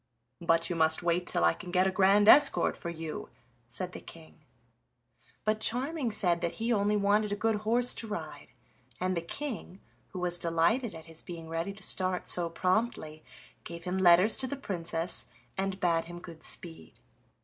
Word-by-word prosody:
"But 165 Hz, 0 st, +2 dB
you 175 Hz, -, -3 dB
must 160 Hz, +1 st, +3 dB
wait 175 Hz, +1 st, 0 dB
till -, -, +1 dB
I 85 Hz, 0 st, +4 dB
can 180 Hz, -, -10 dB
get 180 Hz, +1 st, +2 dB
a 190 Hz, -, +1 dB
grand 195 Hz, +2 st, +4 dB
escort 285 Hz, +4 st, +6 dB
for 170 Hz, -, -6 dB
you," 160 Hz, -2 st, -6 dB, 0.4 s
said -, -, -4 dB
the -, -, -8 dB
King. 80 Hz, -1 st, -14 dB, 1.1 s
But 215 Hz, 0 st, +1 dB
Charming 260 Hz, +4 st, 0 dB
said 180 Hz, -5 st, 0 dB
that 170 Hz, -, -1 dB
he 230 Hz, +1 st, -1 dB
only 210 Hz, 0 st, +1 dB
wanted 205 Hz, +1 st, +2 dB
a -, -, 0 dB
good 225 Hz, +1 st, 0 dB
horse 235 Hz, +4 st, +3 dB
to 225 Hz, -, -6 dB
ride, 210 Hz, 0 st, -7 dB, 0.5 s
and 185 Hz, 0 st, -1 dB
the 170 Hz, -, -1 dB
King, 210 Hz, -, -6 dB, 0.3 s
who 185 Hz, -, -8 dB
was 175 Hz, -1 st, -1 dB
delighted 170 Hz, +8 st, +1 dB
at 160 Hz, -, -10 dB
his 165 Hz, -1 st, -11 dB
being 165 Hz, -2 st, -9 dB
ready 165 Hz, +4 st, -3 dB
to 200 Hz, 0 st, -10 dB
start 185 Hz, -1 st, +1 dB
so 175 Hz, -1 st, 0 dB
promptly, 180 Hz, -3 st, -1 dB, 0.4 s
gave 170 Hz, 0 st, -8 dB
him 180 Hz, +2 st, -2 dB
letters 180 Hz, +4 st, +5 dB
to 260 Hz, -, +1 dB
the 280 Hz, -, -4 dB
Princess, 170 Hz, -7 st, -3 dB, 0.3 s
and 195 Hz, 0 st, -3 dB
bade 165 Hz, -2 st, +1 dB
him 175 Hz, +1 st, -9 dB
good 165 Hz, -2 st, -12 dB
speed. 165 Hz, -2 st, -5 dB
185 Hz, 180 wpm, -30 LUFS, 170-210 Hz, 1.1 s, escort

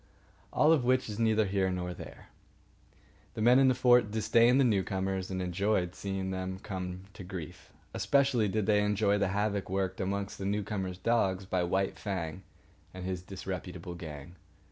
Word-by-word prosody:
All 150 Hz, -, +4 dB
of 145 Hz, -6 st, +2 dB
which 130 Hz, +1 st, +2 dB
is 105 Hz, 0 st, -5 dB
neither 110 Hz, -1 st, +3 dB
here 95 Hz, -1 st, +1 dB
nor 90 Hz, -1 st, -3 dB
there. -, -, -11 dB, 1.1 s
The -, -, -3 dB
men 125 Hz, +3 st, +6 dB
in 135 Hz, -, +5 dB
the 130 Hz, -, +4 dB
fort 125 Hz, -3 st, +5 dB
disdained 115 Hz, +4 st, +4 dB
the -, -, +5 dB
newcomers 95 Hz, -4 st, 0 dB
and 95 Hz, -1 st, -2 dB
enjoyed 90 Hz, 0 st, 0 dB
seeing 95 Hz, -1 st, -3 dB
them 95 Hz, 0 st, -3 dB
come 95 Hz, -2 st, -5 dB
to 95 Hz, -, -9 dB
grief. 90 Hz, -4 st, -8 dB, 0.2 s
Especially 135 Hz, -6 st, +2 dB
did 105 Hz, +1 st, 0 dB
they 105 Hz, -1 st, +3 dB
enjoy 105 Hz, 0 st, +2 dB
the 100 Hz, -, +2 dB
havoc 100 Hz, 0 st, -1 dB
worked 95 Hz, 0 st, -1 dB
amongst 100 Hz, +1 st, -3 dB
the 95 Hz, -, -4 dB
newcomers' 100 Hz, -2 st, -2 dB
dogs 95 Hz, -3 st, +1 dB
by 95 Hz, -1 st, 0 dB
White 95 Hz, +2 st, -1 dB
Fang 95 Hz, -4 st, -4 dB, 0.5 s
and 90 Hz, -1 st, -6 dB
his 90 Hz, -1 st, -3 dB
disreputable 90 Hz, -1 st, -6 dB
gang. 80 Hz, 0 st, -9 dB
95 Hz, 165 wpm, -30 LUFS, 95-110 Hz, 1.1 s, men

